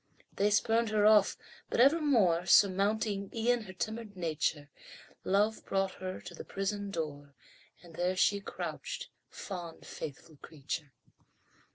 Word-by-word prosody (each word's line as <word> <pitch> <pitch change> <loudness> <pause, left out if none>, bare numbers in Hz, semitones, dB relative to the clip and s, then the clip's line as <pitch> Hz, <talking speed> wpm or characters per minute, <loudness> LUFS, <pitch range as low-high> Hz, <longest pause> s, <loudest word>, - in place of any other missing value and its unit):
They 205 +1 +2
spurned 225 +2 +2
her 210 -1 +2
off 210 -2 +5 0.3
but - - -1
evermore, 245 - +4
Surmounting 200 +2 +3
e'en 235 0 +1
her 190 - -9
timid 220 +1 -5
nature, 155 -3 -1 0.6
Love 210 +3 +1
brought 195 0 0
her 185 0 -4
to 175 - -9
the - - -8
prison 200 +1 -3
door, 145 -6 -5 0.5
And 170 -2 -14
there 180 +3 0
she 200 +2 +3
crouched, - - -5 0.2
fond, 175 -4 -7
faithful 150 +1 -8
creature! 150 -1 -6
195 Hz, 130 wpm, -31 LUFS, 170-215 Hz, 0.6 s, off